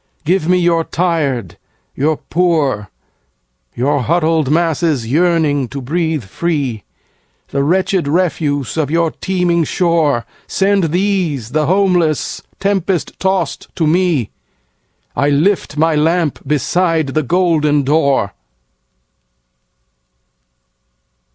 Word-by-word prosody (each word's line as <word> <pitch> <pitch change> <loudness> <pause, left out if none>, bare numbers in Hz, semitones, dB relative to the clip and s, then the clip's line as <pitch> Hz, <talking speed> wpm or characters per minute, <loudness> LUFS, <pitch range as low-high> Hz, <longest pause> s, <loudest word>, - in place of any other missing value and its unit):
"Give 175 0 +1
me 180 - +4
your 170 -2 +2
tired, 150 - -1 0.3
your 150 +3 0
poor, 150 - 0 0.9
Your 140 +3 +1
huddled 160 0 +1
masses 160 -4 +1
yearning 150 -1 +1
to 140 - -6
breathe 160 +1 -1
free, 135 - -2 0.7
The 140 - -1
wretched 185 +1 +1
refuse 150 -5 -1
of 150 -3 0
your 165 0 +1
teeming 180 -3 0
shore. 160 -8 +1 0.2
Send 195 -1 +1
these, 170 - -1
the 155 -1 +1
homeless, 180 -4 +1 0.2
tempest 195 -3 -1
tost 190 0 -1
to 165 - 0
me,I 140 - -3
lift 150 +1 +1
my 160 +1 +3
lamp 160 0 +1
beside 160 +2 +1
the 155 +3 0
golden 155 -2 +2
door!" 140 -8 +1
160 Hz, 100 wpm, -16 LUFS, 140-175 Hz, 0.9 s, me